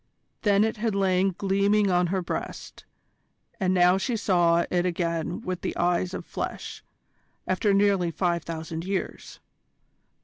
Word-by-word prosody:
Then 205 Hz, -1 st, +3 dB
it 220 Hz, 0 st, -1 dB
had 220 Hz, -1 st, -1 dB
lain 190 Hz, -1 st, +2 dB
gleaming 200 Hz, +1 st, +2 dB
on 180 Hz, 0 st, +2 dB
her 185 Hz, +1 st, -1 dB
breast, -, -, -6 dB, 0.7 s
and 185 Hz, -2 st, +1 dB
now 180 Hz, 0 st, +4 dB
she 230 Hz, +3 st, -1 dB
saw 170 Hz, -4 st, +3 dB
it 175 Hz, -1 st, +2 dB
again 170 Hz, -2 st, -2 dB
with 185 Hz, -1 st, -4 dB
the -, -, -4 dB
eyes 180 Hz, +1 st, 0 dB
of -, -, -6 dB
flesh, -, -, -6 dB, 0.6 s
after 185 Hz, +3 st, +1 dB
nearly 195 Hz, -3 st, +3 dB
five 170 Hz, 0 st, 0 dB
thousand 160 Hz, 0 st, -5 dB
years. 190 Hz, +1 st, -4 dB
185 Hz, 140 wpm, -26 LUFS, 175-200 Hz, 0.7 s, now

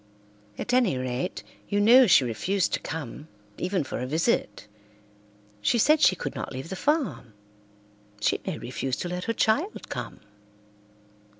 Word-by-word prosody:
"At 245 Hz, -, -3 dB
any 240 Hz, -, +3 dB
rate, 130 Hz, +7 st, -3 dB, 0.3 s
you 205 Hz, -, +1 dB
know 240 Hz, +5 st, +7 dB
she 165 Hz, -7 st, +6 dB
refused 175 Hz, -, -1 dB
to -, -, +1 dB
come, 150 Hz, -1 st, -6 dB, 0.3 s
even 185 Hz, -2 st, 0 dB
for -, -, -5 dB
a 125 Hz, -, -3 dB
visit. 160 Hz, -, 0 dB, 0.9 s
She 235 Hz, -, +2 dB
said 305 Hz, +7 st, +4 dB
she 185 Hz, -, +5 dB
could 145 Hz, -, -5 dB
not -, -, -5 dB
leave 130 Hz, +4 st, -6 dB
the 190 Hz, -, -4 dB
farm. 280 Hz, -, -1 dB, 0.9 s
She 105 Hz, -, +1 dB
may 185 Hz, -5 st, -4 dB
refuse 130 Hz, +1 st, -3 dB
to 175 Hz, -, -4 dB
let 180 Hz, +1 st, -4 dB
her 230 Hz, -, 0 dB
child 285 Hz, -, 0 dB
come." -, -, -6 dB
180 Hz, 155 wpm, -26 LUFS, -, 0.9 s, know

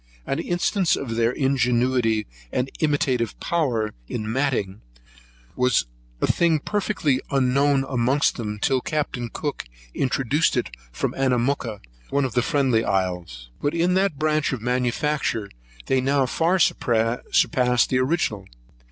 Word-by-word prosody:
An 135 Hz, -, -2 dB
instance 175 Hz, +1 st, +1 dB
of 115 Hz, -5 st, -4 dB
their 115 Hz, 0 st, +2 dB
ingenuity 125 Hz, -4 st, +1 dB, 0.3 s
and 130 Hz, +1 st, -1 dB
imitative 130 Hz, -7 st, 0 dB
powers 120 Hz, -11 st, 0 dB, 0.2 s
in 110 Hz, 0 st, -4 dB
matting, 115 Hz, -7 st, -1 dB, 0.7 s
was 125 Hz, -, +2 dB, 0.3 s
a -, -, +2 dB
thing 170 Hz, -2 st, +3 dB
perfectly 155 Hz, -6 st, 0 dB
unknown 135 Hz, +1 st, +2 dB
amongst 130 Hz, +2 st, +1 dB
them 105 Hz, -3 st, -4 dB
till 130 Hz, +4 st, +1 dB
Captain 140 Hz, -6 st, -2 dB
Cook 145 Hz, -, -4 dB, 0.3 s
introduced 135 Hz, +3 st, +1 dB
it 125 Hz, -, -1 dB, 0.2 s
from -, -, -2 dB
Anamooka, 125 Hz, -4 st, 0 dB, 0.3 s
one 140 Hz, -1 st, +1 dB
of 130 Hz, -, -4 dB
the 125 Hz, -, +2 dB
Friendly 130 Hz, -5 st, +2 dB
Isles: 90 Hz, -10 st, -2 dB
but 145 Hz, +3 st, 0 dB
in 175 Hz, +2 st, +2 dB
that 190 Hz, -5 st, +1 dB
branch 155 Hz, 0 st, +1 dB
of 130 Hz, -, -2 dB
manufacture 125 Hz, -2 st, -1 dB, 0.3 s
they 130 Hz, -1 st, +2 dB
now 135 Hz, +1 st, +2 dB
far 165 Hz, +8 st, +1 dB
surpass 125 Hz, -1 st, +2 dB
their 130 Hz, 0 st, +1 dB
original. 130 Hz, -, -1 dB
130 Hz, 130 wpm, -23 LUFS, 115-145 Hz, 0.7 s, thing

